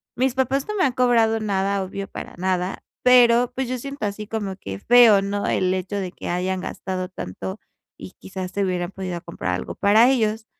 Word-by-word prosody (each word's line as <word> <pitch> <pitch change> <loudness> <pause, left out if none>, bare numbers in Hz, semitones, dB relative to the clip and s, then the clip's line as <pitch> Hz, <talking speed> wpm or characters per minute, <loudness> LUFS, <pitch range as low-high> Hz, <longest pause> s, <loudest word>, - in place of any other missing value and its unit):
Mis 255 +1 +1
papás 265 +1 0
no 425 - -3
me 380 - +2
han 260 - +1
cobrado 230 -3 +3
nada, 200 -1 0
obvio 195 +1 -6
para - - -8
nada, 185 0 -2 0.2
pero 245 -1 +5
pues 265 -1 -2
yo 255 - -2
siento, 275 -1 -5
así 205 +1 -4
como 205 -3 -3
que 95 - -7
feo, 235 - +6
¿no? 200 +1 -2
El 185 0 +1
hecho 190 +2 -3
de 185 -2 -3
que - - -7
hayan 185 +1 -1
gastado 185 -1 -4
tanto 190 - -6 0.4
y - - -10
quizás 185 -1 -6
se 200 - -1
hubieran 180 -1 -2
podido 185 -3 -5
comprar 95 - -3
algo - - -6
para 220 +5 +5
ellos, 220 -4 0
200 Hz, 200 wpm, -23 LUFS, 185-240 Hz, 0.4 s, feo